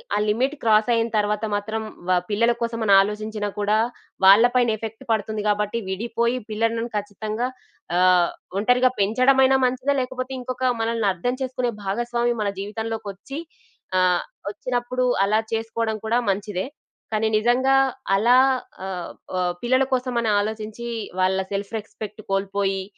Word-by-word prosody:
ఆ - - +2
లిమిట్ 260 +7 +1
క్రాసయిన 225 +1 +3
తర్వాత 210 +1 0
మాత్రం 220 +2 -3 0.3
వ - - +4 0.2
పిల్లల 230 +3 +3
కోసమనాలోచించినా 215 -2 +2
కూడా, 210 +1 +2 0.5
వాళ్ళ 200 +4 +8
పైన 245 -2 +4
ఎఫెక్ట్ 225 +3 -7
పడుతుంది 220 0 -1
గాబట్టి, 210 +2 0
విడిపోయి 235 +4 -1
పిల్లలను 230 +1 0
ఖచ్చితంగా 215 +3 -3 0.5
ఆహ్, 180 -1 +5 0.3
ఒంటరిగా 250 +3 +3
పెంచడమైనా 260 +6 +4
మంచిదా, 255 +3 +1
లేకపోతే 255 +1 -4
ఇంకొకా 255 +1 -2
మనలని 225 -2 0
అర్థం 215 +8 -2
చేసుకునే 255 -2 -1
భాగస్వామి 240 +4 0
మన 205 - +1
జీవితంలోకొచ్చి 220 +4 -5 0.6
ఆహ్, 180 -1 +3 0.3
ఒచ్చినప్పుడు 250 +2 -2 0.2
అలా 215 +2 +2
చేసుకోడం 225 0 -1
కూడా 230 +2 +2
మంచిదే. 195 0 -1 0.5
కానీ, 215 +1 +1
నిజంగా 250 +4 +3 0.4
అలా 240 +5 +5 0.5
ఆహ్, 185 -2 -5 0.3
ఆహ్, 180 -1 +1
పిల్లల 255 +2 +3
కోసమని 245 -3 0
ఆలోచించీ, 220 +2 -4 0.3
వాళ్ళ 185 +1 +2
సెల్ఫ్ 200 +2 -3
రెస్పెక్ట్ 215 0 -8
కోల్పోయి 195 0 0
220 Hz, 125 wpm, -23 LUFS, 205-240 Hz, 0.6 s, వాళ్ళ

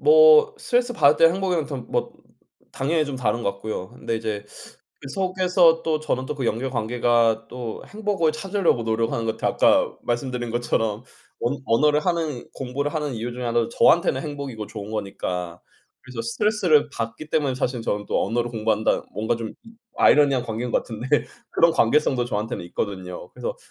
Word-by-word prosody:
뭐 460 -1 +7
스트레스받을 245 - +3
때 165 0 +6
행복이면 180 -5 -1
더 140 - -5
뭐 125 - -3 0.6
당연히 155 +4 0
좀 140 - -4
다른 120 -1 -1
것 100 - +1
같고요. 100 -1 -6
근데 120 -2 -4
이제 110 -2 -4 0.6
그 - - -9
속에서 180 -1 +3
또 160 -1 +1
저는 130 -4 -2
또 150 - -3
그 135 -3 -4
연결관계가 115 -1 +1
또 120 -3 -6
행복을 205 -7 0
찾으려고 185 - 0
노력하는 115 0 -1
것 110 - -1
같아요. - - 0
아까 - - +3
말씀드린 120 0 -2
것처럼 115 -2 -1 0.4
언 120 +4 0
언어를 150 +6 +3
하는 160 -6 -1
공부를 140 +3 -3
하는 150 -4 -2
이유 115 +2 -4
중의 125 0 -5
하나도 115 -1 +1
저한테는 165 +3 +3
행복이고 140 -8 -6
좋은 105 -1 -8
거니까. 90 -4 -4 0.4
그래서 130 -2 -7
스트레스를 170 - +2
받기 115 +7 -5
때문에 140 -4 +1
사실 125 -1 -2
저는 105 -2 -2
또 - - 0
언어를 120 +1 -1
공부한다 110 -1 0
뭔가 110 +2 0
좀 115 -1 -5
이 225 - -14 0.2
아이러니한 140 -4 +5
관계인 115 +2 -4
것 - - +4
같은데 115 +2 -7 0.4
그런 170 - +4
관계성도 130 -2 +2
저한테는 110 -4 -3
있거든요. 90 -1 -5
그래서 - - -5
125 Hz, 395 characters per minute, -23 LUFS, 115-155 Hz, 0.6 s, 뭐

